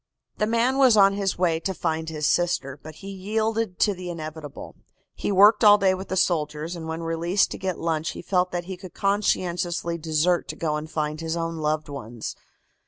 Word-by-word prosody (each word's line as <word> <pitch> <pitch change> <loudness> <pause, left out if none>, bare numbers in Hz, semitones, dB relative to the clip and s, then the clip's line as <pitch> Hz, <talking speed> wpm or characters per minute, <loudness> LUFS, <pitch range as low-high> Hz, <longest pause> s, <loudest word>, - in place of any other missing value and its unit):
"The 215 - +2
man 235 +4 +2
was 255 -5 +6
on 195 -1 +6
his 195 -1 -1
way 170 -3 +1
to 190 +3 -3
find 160 -1 -2
his 155 -2 -3
sister, 160 -6 0
but 155 -1 -10
he 195 +4 -9
yielded 215 +1 -1
to 205 - +4
the 180 -1 -7
inevitable. 155 -3 -7 0.4
He - - -3
worked 205 +3 +6
all 205 -1 +8
day 195 -2 +3
with 190 +1 -6
the 190 - -2
soldiers, 155 -2 0
and 165 -1 -7
when 160 +1 -4
released 170 +4 +1
to - - -6
get 185 -3 -2
lunch 160 -1 -1
he - - -8
felt 180 0 +1
that 175 -1 -2
he 190 0 -6
could 185 -1 -11
conscientiously 175 -4 0
desert 160 +2 +1
to - - -5
go 155 -2 -1
and 150 +1 -5
find 155 0 -2
his 165 +1 -2
own 165 0 -3
loved 155 0 -1
ones." 120 -5 -6
175 Hz, 205 wpm, -25 LUFS, 160-195 Hz, 0.4 s, all